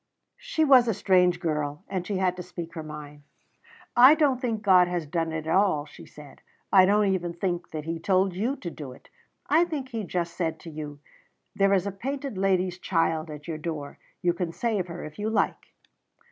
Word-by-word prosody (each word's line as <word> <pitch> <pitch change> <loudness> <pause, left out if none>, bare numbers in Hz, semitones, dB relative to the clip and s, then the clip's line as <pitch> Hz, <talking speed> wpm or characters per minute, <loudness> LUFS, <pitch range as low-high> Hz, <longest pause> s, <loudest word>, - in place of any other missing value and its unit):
She - - 0
was 260 -4 +6
a 225 - +1
strange 180 -2 +3
girl, 150 -2 -2
and 185 -2 -4
she 200 - -1
had 185 -1 +1
to - - -4
speak 170 -1 -8
her 165 - -5
mind. 150 -1 -9 0.7
"I 255 +5 +9
don't 280 -5 +2
think 225 -4 -2
God 185 -3 +6
has 175 -2 -2
done 165 +1 -2
it 160 -1 -4
all," 180 -4 +2
she 145 - -14
said. 150 -2 -14 0.3
"I 190 -2 +8
don't 210 +1 +4
even 175 -3 -1
think 175 -1 -2
that 155 -1 -5
He 165 +1 -4
told 190 +2 +2
you 225 +9 -1
to 175 -10 -7
do 140 -6 -8
it. - - -19 0.4
I 320 +3 +4
think 300 -7 -4
He 225 -3 -4
just 170 -2 -3
said 160 -3 -2
to 165 - -9
you, 150 -1 -7 0.6
'There 195 0 +3
is 185 -1 0
a 200 - -2
painted 270 +5 -5
lady's 185 -1 0
child 165 -3 0
at 150 0 -9
your 160 -2 -4
door. 150 -3 -5 0.2
You 175 -1 +3
can 175 -1 -3
save 210 -2 -1
her 170 0 -7
if 155 +5 -11
you 210 +1 -1
like.' 220 - 0
180 Hz, 205 wpm, -26 LUFS, 160-205 Hz, 0.7 s, I